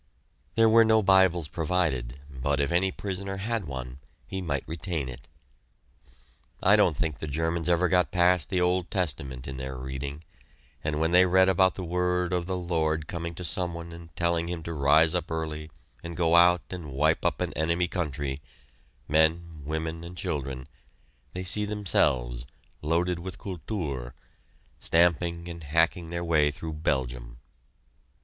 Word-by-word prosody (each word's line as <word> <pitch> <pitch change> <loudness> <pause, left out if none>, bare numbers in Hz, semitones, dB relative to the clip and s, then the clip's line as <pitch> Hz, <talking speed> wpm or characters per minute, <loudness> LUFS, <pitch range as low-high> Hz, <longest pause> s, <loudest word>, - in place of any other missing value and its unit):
There 115 0 +5
were 115 +1 +7
no 110 -1 +4
Bibles 95 -4 +4
provided, 75 -6 -1
but 70 +1 -2
if 70 0 +1
any 95 +2 +2
prisoner 95 0 -4
had 110 -2 -2
one, 65 -1 -6 0.3
he 95 0 -5
might 70 -6 -2
retain 80 -3 -3
it. 60 -1 -9 1.4
I 100 +3 +7
don't 90 -8 +3
think 80 -2 -2
the 80 - -5
Germans 80 +3 -1
have 90 - +4
ever 90 +2 +2
got 90 -3 +3
past 90 -1 +3
the 95 - +1
Old 90 0 +1
Testament 70 - -3
in 65 -1 -6
their 65 0 -5
reading, 65 +4 -6 0.6
and 75 0 -1
when 80 +1 +1
they 90 +1 +6
read 95 +1 +5
about 95 0 +3
the 95 - -5
word 90 +1 0
of 90 -1 -1
the 95 -1 -1
Lord 80 -3 -1
coming 85 +1 -5
to 90 - -6
some 90 0 -1
one 85 0 -7
and 85 0 -11
telling 85 0 0
him 85 -2 -4
to 85 - -5
rise 80 +3 +4
up 90 - -2
early 80 -1 -4 0.3
and 85 -1 -7
go 85 -1 +3
out 90 0 +6
and 85 -6 -6
wipe 75 +4 +2
out - - 0
an - - -2
enemy 85 +3 +1
country 75 -6 -3 0.7
men, 80 +1 +1
women, 80 +2 -3
and 90 +1 -9
children 70 -5 -3 0.7
they 90 - -4
see 105 +3 +3
themselves, 65 - 0 0.3
loaded 85 +3 0
with 95 +2 -7
Kultur, 80 - -5 0.6
stamping 85 0 +2
and 85 -1 -8
hacking 80 +3 +1
their 85 0 -3
way 80 -3 +3
through 80 +2 -6
Belgium. 60 -6 -2
85 Hz, 165 wpm, -27 LUFS, 75-90 Hz, 1.4 s, were